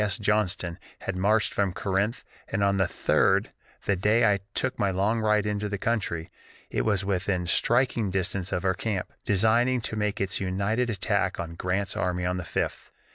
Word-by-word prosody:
S. 105 +1 0
Johnston 105 -5 0 0.2
had 95 - -3
marched 105 +3 +2
from 100 -3 +1
Corinth, 100 +4 -1 0.2
and 100 - -1
on 100 0 +3
the 95 - +3
3d, - - +2 0.4
the 100 - +2
day 105 +3 +4
I 100 - -1 0.2
took 130 0 -1
my 100 - +2
"long 100 +5 +1
ride 105 -1 +2
into 105 0 -1
the 100 - -2
country," 95 -7 -1 0.4
it - - 0
was 100 -3 +1
within 95 -2 0
striking 120 +3 +2
distance 95 0 -1
of 90 +1 -1
our 95 - +3
camp, 100 -2 -3
designing 115 +5 +3
to 110 - -3
make 105 -1 -1
its 95 -1 -1
united 100 +6 0
attack 105 - 0
on 85 -1 -4
Grant's 90 +3 -2
army 90 -1 -1
on 90 +1 0
the 90 - -4
5th. - - -3
100 Hz, 185 wpm, -27 LUFS, 95-110 Hz, 0.4 s, day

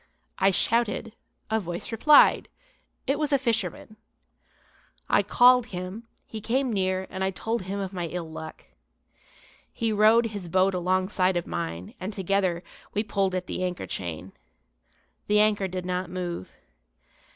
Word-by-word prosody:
I 195 - +5
shouted, 225 +2 +1 0.4
a 220 - +2
voice 175 +1 -5
replied; 285 +7 +5 0.6
it 275 +2 0
was 300 -1 -1
a 280 - +5
fisherman. 230 -3 -2 1.1
I - - +4
called 250 -1 +5
him; 185 +4 -6 0.2
he 220 - -7
came 250 +2 0
near 190 -1 0
and 190 - -3
I 190 - +1
told 225 +4 -3
him 200 +2 -3
of 195 -1 -4
my 175 -2 -3
ill 170 0 -5
luck. 160 0 -9 1.1
He 225 -2 -1
rowed 215 +2 +5
his 195 -5 -6
boat 190 +2 +3
alongside 185 0 +1
of 175 - -2
mine 90 - -5
and, 190 +3 -4
together, 190 -2 0 0.3
we 210 - +1
pulled 195 -3 0
at 185 0 -2
the 185 - -3
anchor 180 -1 -3
chain. 85 0 -5 1.0
The 210 0 +4
anchor 210 -2 +3
did 185 0 -5
not 180 0 -2
move. 175 - -5
190 Hz, 150 wpm, -26 LUFS, 180-220 Hz, 1.1 s, I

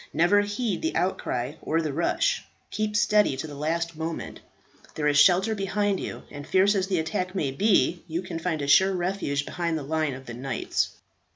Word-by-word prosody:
Never 175 +6 +4
heed 205 +1 -2
the 325 +1 -2
outcry 130 -8 -1
or 165 - 0
the 155 -3 -2
rush, 325 - +1 0.3
keep 215 -1 -2
steady 210 - +3
to - - -4
the 150 - -8
last 165 +3 -2
moment. 160 +1 -5 0.6
There 150 - -2
is 145 0 +4
shelter 190 +7 +5
behind 200 -1 0
you, - - -6
and 145 -1 -8
fierce 195 +2 +4
as 190 -2 0
the 190 -2 0
attack 185 +3 -2
may 150 -8 0
be, 180 +1 +2
you 170 +2 -3
can 175 -3 -5
find 160 -3 -2
a - - -3
sure 190 +7 +5
refuge 175 -6 -1
behind 170 -2 -2
the 150 - -5
line 155 -1 -1
of 130 0 -11
the 120 - -7
knights." 130 +2 -2
170 Hz, 195 wpm, -26 LUFS, 150-195 Hz, 0.6 s, shelter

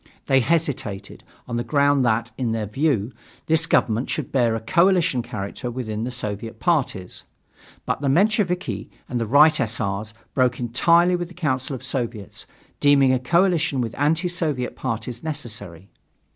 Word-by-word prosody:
They 135 - +4
hesitated, 130 -9 -2 0.2
on 120 -1 -3
the 120 - -1
ground 140 -1 +2
that, 115 0 0
in 120 -3 -1
their 110 -1 -2
view, 120 0 0 0.3
this 160 +1 +2
government 115 -5 +1
should 155 - -3
bear 120 -4 +2
a - - -2
coalition 170 - +2
character 105 +1 -5
within 115 -3 -4
the - - -3
Soviet 110 -2 -4
parties. 130 - -1 0.6
But - - -2
the 140 - +1
Mensheviki 185 +2 +1 0.2
and 120 -2 -2
the 115 - -2
Right 150 +5 +5
S. 115 -2 0
R.'s 105 +1 -3 0.2
broke 125 -2 +1
entirely 170 +9 +3
with 175 -1 -3
the 180 - -15
Council 135 -5 -1
of 130 - -9
Soviets, 120 -6 -4 0.3
deeming 140 -2 +5
a 130 - +1
coalition 165 0 +2
with 115 -3 -2
anti 160 +5 +1
Soviet 155 -8 -2
parties 120 -1 -4
necessary. 105 - -6
130 Hz, 160 wpm, -23 LUFS, 115-155 Hz, 0.6 s, Right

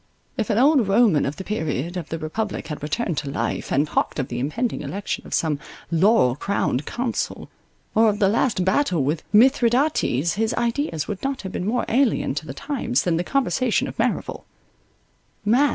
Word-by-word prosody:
If 225 -4 -2
an 215 - +1
old 270 -3 +4
Roman 195 -8 +4
of 140 - -3
the 190 - -7
period 165 -4 -2
of 175 -4 -5
the 165 - -3
Republic 195 +8 -4
had 150 - -5
returned 160 +2 -1
to 140 - -5
life, 140 - -3
and 145 +2 +3
talked - - -1
of 135 -4 -2
the 120 - -3
impending 220 - -2
election 200 +2 -4
of - - -7
some 155 -3 0 0.3
laurel 170 - +4
crowned 150 -5 -1
consul, 240 -1 -3 0.4
or 220 0 +5
of 205 - -1
the 200 -2 +3
last 210 -2 +1
battle 190 - +2
with 150 +4 -1
Mithridates, 235 - +3
his 220 +1 0
ideas 235 - -1
would 205 -3 -5
not 270 -2 -3
have 190 - -5
been 185 - -3
more 240 +3 0
alien 250 - +2
to 155 +2 -5
the - - -5
times, 265 -4 -1
than 170 -2 +1
the 175 - 0
conversation 255 +1 +1
of - - -7
Merrival. - - -1
200 Hz, 185 wpm, -23 LUFS, 155-240 Hz, 0.4 s, or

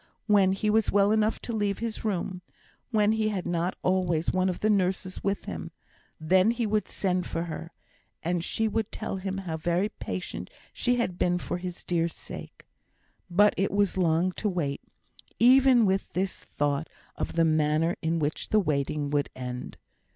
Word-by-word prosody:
When 200 -3 +4
he 210 +2 0
was 220 0 +2
well 200 0 +4
enough 215 0 +2
to 235 - -4
leave 205 -2 0
his 230 -1 -4
room, 185 -3 -2 0.5
when 215 -3 +3
he 220 -1 +1
had 195 -4 -3
not 175 +1 -1
always 180 -3 +1
one 185 0 +2
of 180 - -4
the 215 - +2
nurses 185 -1 0
with 200 0 -1
him, 80 -2 -5 0.5
then 185 +6 +4
he 235 0 0
would 210 -2 0
send 185 -2 -1
for 165 - -2
her, 165 0 -6 0.5
and 175 0 0
she 220 +5 0
would 220 0 -1
tell - - -4
him 190 0 -3
how 175 -5 -4
very 175 +5 0
patient 185 -3 -5 0.2
she 245 0 +1
had 185 -8 -1
been 180 0 +2
for 175 0 -4
his 180 -1 -6
dear 170 -1 +1
sake. 170 - -10 0.6
But 205 +4 +5
it 195 - +1
was 200 -1 +1
long 175 0 +2
to 210 - +1
wait 150 -7 -2 0.6
even 255 -1 +6
with 190 0 0
this 190 +1 -1
thought 145 +2 -1 0.3
of - - -3
the 165 0 +3
manner 155 +2 +2
in 165 0 0
which 150 -1 -2
the 215 - +4
waiting 145 -4 -1
would 145 -1 +1
end. 125 -1 -6
185 Hz, 180 wpm, -27 LUFS, 165-210 Hz, 0.6 s, even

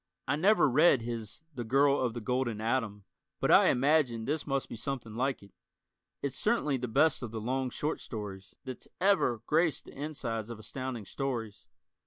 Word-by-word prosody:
I 135 - +2
never 190 +4 +4
read 135 -2 +5
his 115 +2 -6
"The 125 -3 -4
Girl 140 +4 +3
of 125 -2 -1
the 120 - -4
Golden 120 -1 -1
Atom" 110 -3 -1 0.4
but - - +2
I - - +7
imagine 130 -4 +2
this 150 +2 -2
must 135 -1 -1
be - - -7
something 115 -1 -4
like 130 0 -1
it. 100 - -16 0.7
It's 140 -2 -2
certainly 150 - +1
the 125 0 -3
best 140 +6 +3
of 120 - -4
the 110 0 -5
"long 130 +3 -1
short 150 +5 -3
stories" 100 -3 -7
that's 130 -2 -7
ever 185 - +3
graced 155 +1 +1
the - - -13
insides 125 -7 -4
of 115 - -6
Astounding 125 0 -5
Stories. 115 -5 -4
130 Hz, 180 wpm, -30 LUFS, 115-140 Hz, 0.7 s, I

